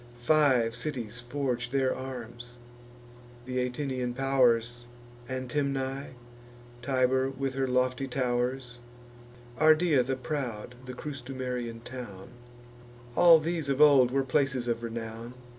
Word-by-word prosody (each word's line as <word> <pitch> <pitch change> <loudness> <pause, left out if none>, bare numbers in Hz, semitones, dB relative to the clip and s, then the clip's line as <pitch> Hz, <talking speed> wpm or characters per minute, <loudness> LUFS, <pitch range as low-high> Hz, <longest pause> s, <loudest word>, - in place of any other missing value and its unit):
Five 125 -3 +3
cities 120 -5 -4
forge 125 -1 -2
their 130 0 +1
arms: 120 -2 -8 0.9
th' - - -13
Atinian 125 0 -2
pow'rs, 120 -3 +2 0.4
Antemnae, 135 +1 -2 0.7
Tibur 130 0 +1
with 135 0 -3
her 135 0 -1
lofty 130 +1 0
tow'rs, 125 -1 -2 0.8
Ardea 155 -2 +5
the 135 +2 -2
proud, 125 -5 -4
the 125 - -6
Crustumerian 125 -4 -5
town: 120 -7 -8 0.9
All 170 -2 +8
these 160 -2 -2
of 135 0 0
old 140 -4 +7
were 135 +2 +1
places 135 -2 0
of 115 -1 -1
renown. 115 +1 -6
130 Hz, 110 wpm, -29 LUFS, 120-135 Hz, 0.9 s, All